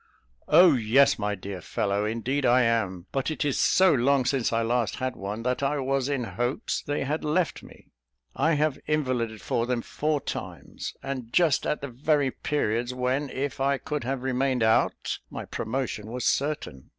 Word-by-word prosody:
"Oh, 180 -3 +7
yes, 130 +3 +4
my 105 0 -1
dear 95 -1 -7
fellow, 100 +3 -1
indeed 120 +6 -1
I 125 0 +5
am; 100 -7 0
but 135 +2 -1
it 155 -1 -2
is 140 - 0
so 190 -2 +5
long 135 0 +3
since 130 -2 +1
I 115 0 +1
last 120 0 0
had 130 -1 -3
one, 105 +4 -5
that 125 +2 -1
I 140 +2 +1
was 135 0 0
in 140 -3 -1
hopes 120 +2 -2
they 145 -1 -2
had 150 +3 -2
left 160 +2 0
me. - - -16 0.4
I 160 +4 +2
have 150 -1 +1
invalided 130 -8 -1
for 115 0 0
them 125 -2 -1
four 150 0 -1
times, - - -6
and 130 -4 -5
just 160 -1 +3
at 150 - -1
the 140 - -4
very 140 +2 +1
periods 120 -4 -1
when, 130 +3 -1
if 140 +1 -3
I 140 0 +2
could 150 0 -4
have 130 +1 -3
remained 130 -1 +1
out, 110 0 +1
my - - -6
promotion 110 -3 -3
was 125 0 -4
certain." 140 - -1
130 Hz, 180 wpm, -26 LUFS, 115-145 Hz, 0.4 s, Oh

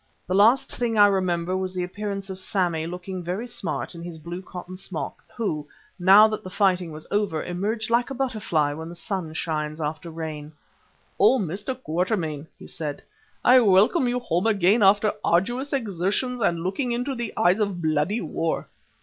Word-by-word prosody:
The 185 - -2
last 220 +7 +4
thing 235 -2 -1
I 205 - +8
remember 185 -3 +1
was 185 0 -3
the 180 - -1
appearance 195 +1 -4
of 190 - -3
Sammy, 175 -4 0
looking 180 +1 -6
very 185 +7 -3
smart, 190 -10 -4
in 170 - -9
his 170 -1 -7
blue 170 +3 -7
cotton 180 0 -9
smock, 185 - -5 0.2
who, 155 -10 -2 0.3
now 195 +4 +8
that 215 - -4
the 185 - -7
fighting 185 -4 +1
was 155 0 -8
over, 205 -6 0
emerged 215 +6 -2
like 240 +2 +2
a 270 - -5
butterfly 205 - 0
when 160 +2 -7
the 170 - -9
sun 175 -1 -4
shines 155 -1 -3
after 155 +2 -4
rain. 155 -2 -6 0.7
"Oh! 265 - +6
Mr. 205 - -3
Quatermain," 165 - -2
he - - -12
said, 150 -3 -5 0.4
"I 255 +1 +8
welcome 220 - +4
you 245 +1 0
home 195 -5 0
again 205 +1 +3
after 205 +2 +5
arduous 240 +11 +1
exertions 230 +1 -1
and 170 -5 +1
looking 240 +8 -1
into 250 +3 -2
the 235 -4 -4
eyes 180 +4 +3
of 200 -4 -1
bloody 160 +7 0
war. 165 0 -2
185 Hz, 175 wpm, -25 LUFS, 170-215 Hz, 0.7 s, I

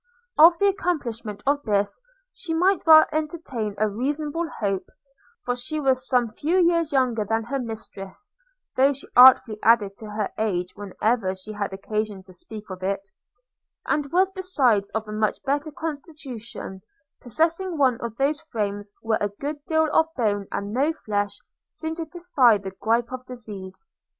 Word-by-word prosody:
Of 335 +3 +8
the 405 - +2
accomplishment 240 - -1
of 285 +1 +2
this 205 - 0 0.3
she 325 -3 -4
might 365 +2 +2
well 315 -1 +9
entertain 300 -9 -3
a 215 - +2
reasonable 295 +9 -2
hope; 195 -3 -2 0.6
for 245 - 0
she 255 +6 -3
was 265 -2 +1
some 245 -2 +2
few 300 +11 -1
years 335 -3 +3
younger 250 -5 +2
than 225 +2 -1
her 270 +4 -3
mistress 220 - -8 0.4
(though 275 +2 +4
she 275 - -11
artfully 250 -3 +8
added 210 -4 +4
to 220 - -9
her 210 -1 -2
age, 180 -5 -1
whenever 205 0 -1
she 190 +3 -8
had 205 -2 -3
occasion 205 0 -3
to 185 -1 -16
speak 210 +4 -10
of 185 0 -7
it), 195 +1 -2 0.8
and 290 -2 -1
was 375 +2 +3
besides 275 - +1
of 220 0 -3
a - - -7
much 215 0 0
better 285 +2 -1
constitution, 275 - -7 0.4
possessing 330 - 0
one 260 -5 +2
of 235 -2 -5
those 290 +3 +1
frames, 205 -8 -4
where 225 -1 +1
a 205 - +1
good 285 +8 -6
deal 315 -1 +3
of 320 - +4
bone 205 -4 0
and 200 0 -3
no 285 +6 +2
flesh 205 -8 -2 0.3
seem 320 0 -5
to 330 - -3
defy 315 -9 +3
the 195 -1 -7
gripe 230 +5 0
of 255 0 -5
disease. 215 - -7
240 Hz, 165 wpm, -24 LUFS, 210-310 Hz, 0.8 s, well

